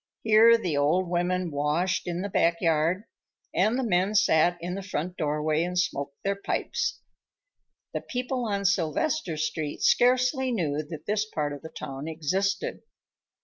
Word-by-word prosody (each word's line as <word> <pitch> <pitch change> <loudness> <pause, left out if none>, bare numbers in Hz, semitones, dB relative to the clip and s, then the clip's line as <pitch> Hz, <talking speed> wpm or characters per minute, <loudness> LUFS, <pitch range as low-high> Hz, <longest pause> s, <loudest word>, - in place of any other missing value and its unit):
Here 225 +1 +7
the 180 -9 -2
old 160 +6 +2
women 175 0 0
washed 150 +7 0
in 175 +1 -2
the 200 - -3
back 170 -2 +2
yard, 165 +3 +1 0.5
and 215 +6 +2
the 265 - 0
men 195 -1 +1
sat 175 -4 +4
in 175 +1 -4
the 195 - -4
front 180 -2 -4
doorway 150 0 0
and 180 +1 -3
smoked 140 -5 -1
their 200 0 0
pipes. 470 - -2 0.9
The - - -2
people 250 0 -3
on 200 -1 -2
Sylvester 180 - 0
Street 155 -1 -3
scarcely 255 +1 +3
knew 155 -9 -1
that 160 -1 -8
this 210 +1 0
part 150 -5 -2
of 145 - -8
the 160 - -8
town 135 -1 -7
existed. 185 +5 -1
180 Hz, 155 wpm, -27 LUFS, 155-205 Hz, 0.9 s, Here